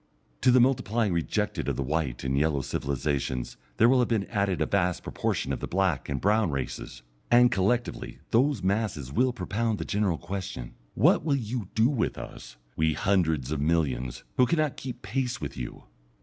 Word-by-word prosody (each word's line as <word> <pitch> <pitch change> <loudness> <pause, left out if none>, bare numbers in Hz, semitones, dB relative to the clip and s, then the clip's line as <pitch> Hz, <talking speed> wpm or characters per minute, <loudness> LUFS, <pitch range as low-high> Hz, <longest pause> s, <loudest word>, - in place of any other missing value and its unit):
To - - +4
the 125 +1 +6
multiplying 120 -5 +2
rejected 85 -2 -1
of - - -1
the 70 - -2
white 70 -3 -2
and 65 0 0
yellow 75 0 +2
civilizations 70 -2 -2 0.2
there 115 - +6
will 130 +1 +5
have 125 - +3
been 110 -4 0
added 100 -4 0
a - - +2
vast 90 -3 0
proportion - - -2
of - - -3
the - - -4
black 90 -7 0
and 70 -1 -1
brown 105 0 +2
races, 65 -3 -5 0.3
and 120 0 +6
collectively 115 +5 -1
those 130 -2 +2
masses 95 - -1
will 130 - +3
propound 110 +1 -1
the - - -4
general 100 -5 0
question, 95 -8 -6 0.2
"What - - +4
will 145 -3 +2
you 120 -4 -3
do 110 +2 +5
with 130 -5 -1
us, - - -9 0.2
we 80 0 +2
hundreds 80 -8 +1
of 75 -2 -1
millions, 65 -6 0
who 125 - +5
cannot 155 -2 +1
keep 130 -2 -7
pace 125 +5 -2
with - - -5
you?" - - -7
95 Hz, 180 wpm, -27 LUFS, 75-120 Hz, 0.3 s, the